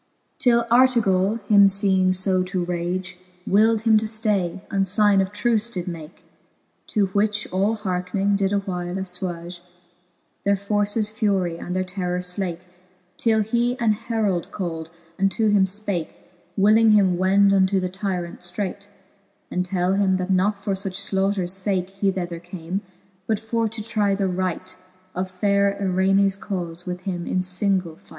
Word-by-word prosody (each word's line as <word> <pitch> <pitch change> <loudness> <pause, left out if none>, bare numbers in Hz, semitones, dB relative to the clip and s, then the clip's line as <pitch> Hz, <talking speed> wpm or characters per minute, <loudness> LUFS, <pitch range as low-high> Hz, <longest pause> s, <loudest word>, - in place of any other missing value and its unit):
Till 235 -2 +3
Artegall 230 -5 +3
him 200 -2 +7
feeing 190 -1 +2 0.2
{o 185 -1 +3
to 185 -1 -2
rage, 180 +1 -3 0.3
Willd 220 +2 +3
him 220 -1 +4
to 220 - -3
ftay, 205 -5 -1
and 195 -1 +2
figne 200 +1 +3
of 190 0 -2
truce 230 +1 0
did 180 -6 -5
make; 165 -1 -8 0.6
To 210 -3 +1
which 210 +2 +1
all 200 +4 +1
hearkning, 195 0 -1
did 195 -1 0
a 200 -1 +1
while 180 -2 -4
afTwage 180 -2 -4 0.8
Their 200 0 +2
forces 205 +2 0
furie, 195 -6 0
and 180 - -4
their 185 - +1
terrors 180 -1 -2
flake 180 -3 -3 0.3
\ 185 0 -38
Till 220 -2 +2
he 240 +3 0
an 230 -3 +2
herauld 210 -5 -2
cald, 165 -4 -4 0.3
and 195 0 +2
to 220 +1 +1
him 205 -2 +4
fpake, 190 - -3 0.4
Willing 215 +2 +5
him 190 -4 +3
wend 195 +1 +4
unto 190 0 +3
the 185 - -1
tyrant 185 -2 -4
firreight, 190 +3 -5 0.6
And 180 - 0
tell 180 0 0
him, 195 -1 +2
that 185 +1 -2
not 195 +2 +1
for 200 - -1
fuch 195 +1 -2
flaughters 190 -2 0
fake 190 -2 -1
He 195 0 0
thether 175 -3 -4
came, 175 +2 -5 0.5
but 220 -2 +1
for 225 0 -1
to 220 0 -6
trie 210 -3 0
the 195 0 -1
right 185 0 -3 0.4
Of 185 +1 -3
fayre 200 +1 +1
Irenacs 195 +1 +2
caufe 175 -3 -5
with 180 0 -4
him 180 -2 -4
in 185 - 0
fingle 185 -3 -1
fight. - - -23
195 Hz, 160 wpm, -23 LUFS, 180-205 Hz, 0.8 s, him